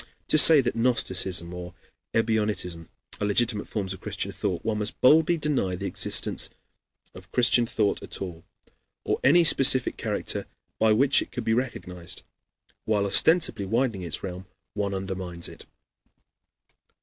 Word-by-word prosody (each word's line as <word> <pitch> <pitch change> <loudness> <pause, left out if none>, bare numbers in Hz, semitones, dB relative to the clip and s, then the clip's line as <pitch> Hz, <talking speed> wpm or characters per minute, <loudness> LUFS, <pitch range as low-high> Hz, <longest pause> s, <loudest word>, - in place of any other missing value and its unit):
To - - +4
say 150 +1 +8
that 120 - -3
gnosticism 95 -7 -1
or 90 0 -9 0.4
ebionitism 105 -7 -2 0.3
are 105 - -2
legitimate 105 0 0
forms 95 -3 -4
of 95 - -11
Christian - - -4
thought, 95 -3 -4
one 110 -1 -2
must 105 - -4
boldly 160 +5 +4
deny 145 - -1
the 100 +2 -7
existence - - +2 0.6
of 90 0 -15
Christian 120 -1 +3
thought 105 -3 -1
at - - -7
all, 85 -4 -8 0.6
or - - -1
any 170 +6 +5
specific 130 -5 +4
character - - -2 0.3
by 110 0 +3
which 130 +6 +3
it - - -8
could 125 - -6
be 110 - 0
recognized. 90 -8 -5 0.6
While 105 -2 0
ostensibly 105 - +3
widening 115 -2 -1
its 85 -3 -4
realm, 90 0 -7 0.3
one 100 -1 -3
undermines 95 -3 -5
it. - - -14
105 Hz, 145 wpm, -25 LUFS, 95-125 Hz, 0.6 s, say